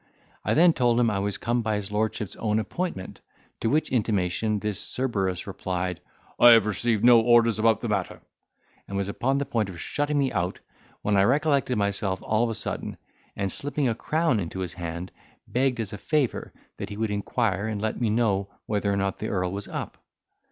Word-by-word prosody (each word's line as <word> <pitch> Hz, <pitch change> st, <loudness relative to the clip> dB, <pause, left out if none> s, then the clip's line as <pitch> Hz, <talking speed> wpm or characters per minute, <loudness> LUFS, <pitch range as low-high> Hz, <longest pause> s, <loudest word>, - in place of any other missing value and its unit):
I -, -, +1 dB
then 170 Hz, +1 st, +6 dB
told 120 Hz, -3 st, +2 dB
him 115 Hz, -2 st, +3 dB
I 100 Hz, -, -1 dB
was 100 Hz, 0 st, -1 dB
come 120 Hz, +1 st, 0 dB
by 110 Hz, -1 st, -1 dB
his 105 Hz, 0 st, -4 dB
lordship's 105 Hz, -1 st, -2 dB
own 110 Hz, -1 st, 0 dB
appointment, 110 Hz, -, -4 dB, 0.4 s
to 115 Hz, -, 0 dB
which 155 Hz, +4 st, +1 dB
intimation 105 Hz, -2 st, 0 dB
this 105 Hz, -1 st, -2 dB
Cerberus 100 Hz, -8 st, -1 dB
replied, 90 Hz, -1 st, -3 dB, 0.4 s
"I 120 Hz, -, +9 dB
have 115 Hz, -3 st, +5 dB
received 110 Hz, +1 st, 0 dB
no 120 Hz, -1 st, +8 dB
orders 115 Hz, -1 st, +4 dB
about 110 Hz, -1 st, +3 dB
the 120 Hz, -, -2 dB
matter," 100 Hz, -4 st, -2 dB, 0.7 s
and 100 Hz, -, -4 dB
was 100 Hz, -1 st, -1 dB
upon 130 Hz, +6 st, 0 dB
the 140 Hz, -, -1 dB
point 115 Hz, -7 st, -1 dB
of 85 Hz, -3 st, -9 dB
shutting 145 Hz, -, -1 dB
me 135 Hz, -2 st, +2 dB
out, 90 Hz, +2 st, -2 dB, 0.4 s
when 105 Hz, -, +1 dB
I -, -, +5 dB
recollected 140 Hz, -2 st, +2 dB
myself 100 Hz, -2 st, 0 dB
all 110 Hz, +2 st, +1 dB
of 120 Hz, -, +1 dB
a 115 Hz, -, -3 dB
sudden, -, -, -2 dB, 0.4 s
and 100 Hz, -1 st, -2 dB
slipping 145 Hz, -1 st, -1 dB
a 115 Hz, -, +2 dB
crown 155 Hz, +1 st, 0 dB
into 95 Hz, +1 st, -4 dB
his 90 Hz, -, -4 dB
hand, 85 Hz, 0 st, -5 dB, 0.4 s
begged 125 Hz, -1 st, +1 dB
as 105 Hz, -3 st, -3 dB
a 105 Hz, -, -6 dB
favour 150 Hz, -6 st, -1 dB, 0.3 s
that -, -, -5 dB
he 100 Hz, -, -7 dB
would 110 Hz, -1 st, -1 dB
inquire, 105 Hz, 0 st, -1 dB
and 110 Hz, -2 st, -3 dB
let 110 Hz, +3 st, -2 dB
me 115 Hz, -, +2 dB
know 105 Hz, -3 st, +1 dB, 0.2 s
whether 105 Hz, -1 st, 0 dB
or 100 Hz, -, 0 dB
not 95 Hz, 0 st, -1 dB
the 110 Hz, -, -4 dB
earl 90 Hz, -2 st, -1 dB
was 100 Hz, +1 st, -5 dB
up. -, -, -6 dB
110 Hz, 200 wpm, -26 LUFS, 100-120 Hz, 0.7 s, I